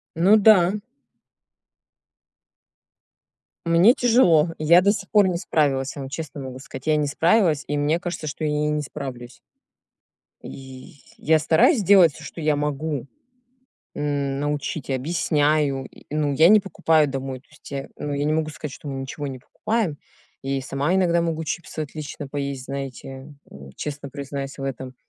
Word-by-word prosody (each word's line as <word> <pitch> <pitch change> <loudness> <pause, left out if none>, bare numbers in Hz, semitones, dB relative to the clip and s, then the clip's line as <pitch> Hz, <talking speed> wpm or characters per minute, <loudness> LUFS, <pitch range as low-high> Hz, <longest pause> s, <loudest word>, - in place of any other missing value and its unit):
Ну 185 +6 +5
да. 200 -4 +5 2.9
Мне 170 +8 +6
тяжело, 185 - +4
я 170 +4 +5
до 200 +2 +4
сих 200 -2 -6
пор 205 -2 +4
не 180 -2 0
справилась, 140 -6 0
я 140 - -5
вам 135 - -7
честно 155 0 -6
могу 130 -1 -7
сказать. 135 0 -10
Я 155 -1 +3
не 150 -1 +1
справилась, 165 +1 +2
и 145 - -2
мне 150 +3 +1
кажется, 175 -3 -5
что 150 +2 -4
я 150 - +1
и 150 0 0
не 150 0 -1
справлюсь. 125 -4 -8 1.0
И 130 +5 -11 0.2
я 160 +1 +3
стараюсь 165 - +3
делать 185 -4 +6
всё, 155 - -12
что 165 - -8
я 155 -1 +1
могу: 145 -1 -2 0.9
м, 140 -2 -2
научить 145 -1 -3
и - - 0
объясняю. 145 -1 +1
И, - - -16
ну, 150 -2 0
я 160 +4 +6
не 215 +1 +7
покупаю 160 -6 +2
домой. 135 -1 -5
То - - -34
есть 150 - -15
я, 135 -1 -4
ну, 145 - -4
я 140 0 -1
не 155 - +1
могу 155 0 0
сказать, 150 -2 -7
что 150 - -10
мы 135 -1 -4
ничего 140 +2 -5
не 130 -2 -7
покупаем, 215 - -2 0.5
я 135 0 -1
и - - -3
сама 140 +5 -1
иногда 170 -2 +2
могу 165 -1 -2
чипсы 160 +1 -5
отлично 150 -1 -6
поесть, 140 -2 -4
знаете. 135 +1 -7
М, 70 -1 -12
честно 145 -1 -6
признаюсь 140 0 -6
в 135 - -6
этом. 130 -1 -5
150 Hz, 170 wpm, -23 LUFS, 135-165 Hz, 2.9 s, не